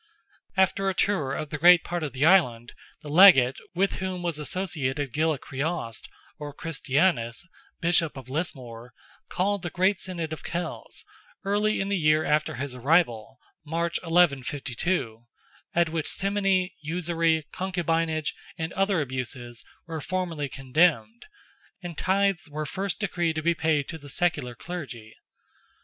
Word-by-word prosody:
After 190 +1 +2
a 190 - -2
tour 155 -10 +1
of 155 - -5
great 175 +4 +6
part 175 0 -3
of 150 -3 -3
the 130 +3 +1
Island, 125 -10 +3 0.3
the 150 - -8
Legate, 145 -7 +7 0.2
with 195 +3 +1
whom 185 -1 -4
was 170 -3 -1
associated 145 -6 -2
Gilla 155 +1 +1
Criost, 135 -4 -4 0.3
or 145 -1 -6
Christianus, 150 -5 0 0.4
Bishop 165 -3 +2
of 130 -2 -9
Lismore, 125 -6 -5 0.3
called 200 +2 0
the 175 - -4
great 185 +3 +1
Synod 170 -4 -4
of 155 - -8
Kells, 175 +1 -5 0.4
early 210 +2 +1
in 195 - -1
the 200 -2 0
year 155 0 +3
after 150 0 +1
his 135 +1 -4
arrival 130 -3 +1 0.3
(March, 165 +2 -1
1152), 140 -6 0 0.5
at 170 -1 +3
which 160 -1 -2
simony, 195 -2 +1
usury, 165 -1 0
concubinage, 165 -4 -1 0.2
and 160 0 -4
other 195 -3 +1
abuses, 125 -3 -5 0.2
were 165 -2 -5
formally 170 -6 -3
condemned, 165 - +1 0.6
and 175 -2 -6
tithes 195 -1 +1
were 155 +1 -4
first 195 +5 -3
decreed 175 -5 -1
to 155 - -3
be 170 +1 +3
paid 155 -4 0
to 160 - -6
the 145 -1 -12
secular 145 -6 0
clergy. 125 -9 -7
160 Hz, 140 wpm, -26 LUFS, 140-180 Hz, 0.6 s, Legate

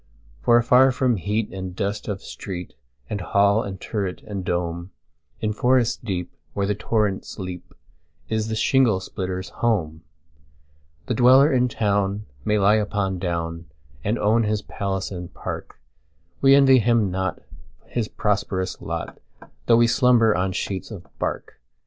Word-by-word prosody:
For 120 - +5
afar 125 +3 +5
from 125 -2 +1
heat 105 +4 -2
and 95 -1 -6
dust 100 +2 -3
of 100 -2 -4
street, 90 -3 -7 0.3
And 100 - -4
hall 100 +3 +3
and 95 -3 -6
turret, 100 -4 -4
and 100 -3 -5
dome, 85 0 -2 0.5
In 110 -1 0
forest 125 +1 +2
deep, 90 -6 -4 0.2
where 100 - 0
the 105 - +1
torrents 105 -1 -1
leap, 90 -3 -7 0.5
Is 110 -1 -1
the 110 - -2
shingle 115 -3 +3
splitter's 95 -1 -5
home. 80 -10 -1 1.0
The - - -1
dweller 130 +5 +6
in 125 -1 +3
town 100 -2 0 0.2
may 105 +5 +1
lie 105 +2 +4
upon 100 -3 -1
down, 85 -2 -3 0.4
And 105 +4 0
own 110 +3 +3
his 105 -1 -1
palace 95 -1 -3
and 90 -2 -7
park:We 75 - -2
envy 135 -2 +6
him 115 -3 +2
not 95 +1 -2 0.5
his 115 -3 -2
prosperous 100 -3 -2
lot, - - -5 0.5
Though 115 - +6
we 120 - +5
slumber 115 -2 +4
on 95 +1 0
sheets 95 +1 -4
of 95 -6 -9
bark. - - -4
100 Hz, 145 wpm, -23 LUFS, 95-115 Hz, 1.0 s, dweller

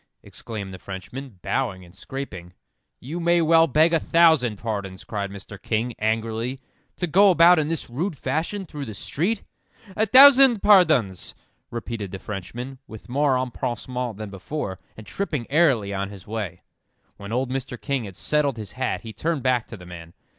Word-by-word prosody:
exclaimed 100 -4 -8
the 95 - -9
Frenchman, 100 +6 -8
bowing 105 -9 -2
and 85 - -17
scraping. 95 -5 -7 0.5
"You 155 +7 -6
may 170 0 +3
well 165 0 +5
beg 160 +3 +3
a 165 - +4
thousand 160 -10 +3
pardons," 100 -4 -5
cried 100 -2 -4
Mr. 100 0 -10
King, 115 +3 -1
angrily, 115 +3 -1 0.4
"to 180 - -1
go 195 +5 +5
about 175 -1 +6
in 150 - 0
this 165 -1 -3
rude 155 +7 -3
fashion 160 +10 -2
through 150 -4 -7
the 110 -4 -7
street." 190 - -2 0.5
"A 220 +1 +1
thousand 265 -2 +8
pardons," 155 - +4 0.3
repeated 115 -3 -5
the 95 - -6
Frenchman, 115 +8 -7
with 110 +1 -12
more 140 +1 +2
empressement 125 -2 -3
than 105 -2 -7
before, 95 -1 -5 0.2
and 110 - -10
tripping 150 - -3
airily 135 -11 +3
on 100 0 -3
his 100 -3 -12
way. 105 -5 -5 0.5
When 100 +1 -9
old 125 +2 -1
Mr. 130 -2 -4
King 140 -5 -2
had 95 -2 -9
settled 145 0 0
his 105 -2 -7
hat, 130 0 -2
he 115 -2 -9
turned 155 +5 -2
back 125 -3 +1
to 110 - -9
the 90 - -13
man. 85 -1 -11
125 Hz, 170 wpm, -24 LUFS, 105-155 Hz, 0.5 s, thousand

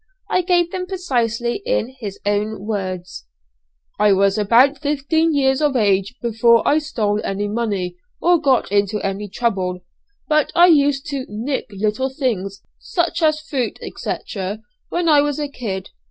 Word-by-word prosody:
I 370 - +3
give 350 -1 +2
them 365 -1 -4
precisely 240 - -1
in - - -1
his 205 -4 -6
own 205 0 -1
words: 185 - -4 0.7
"I 210 -1 +5
was 195 0 +3
about 240 +7 +4
fifteen 300 +3 +1
years 270 -1 +2
of 295 -3 +2
age 200 0 +2
before 235 0 +3
I 300 - +4
stole 215 -8 -1
any 200 +1 -2
money, 205 -5 -2 0.2
or 345 -1 +3
got 265 -8 +2
into 205 +1 +1
any 195 +1 -3
trouble; 185 -5 -1 0.5
but 305 -1 +2
I 345 - +8
used 285 -3 +3
to 270 -2 -4
'nick' 230 +7 -3
little 215 +6 -1
things, 215 -8 -3 0.2
such 345 -1 -1
as 310 -1 +2
fruit, 270 -7 -3 0.2
&c., - - -2 0.7
when 345 -1 -1
I 300 -2 +6
was 290 -1 -1
a 295 - -1
kid. 205 -9 -5
235 Hz, 155 wpm, -20 LUFS, 205-295 Hz, 0.7 s, I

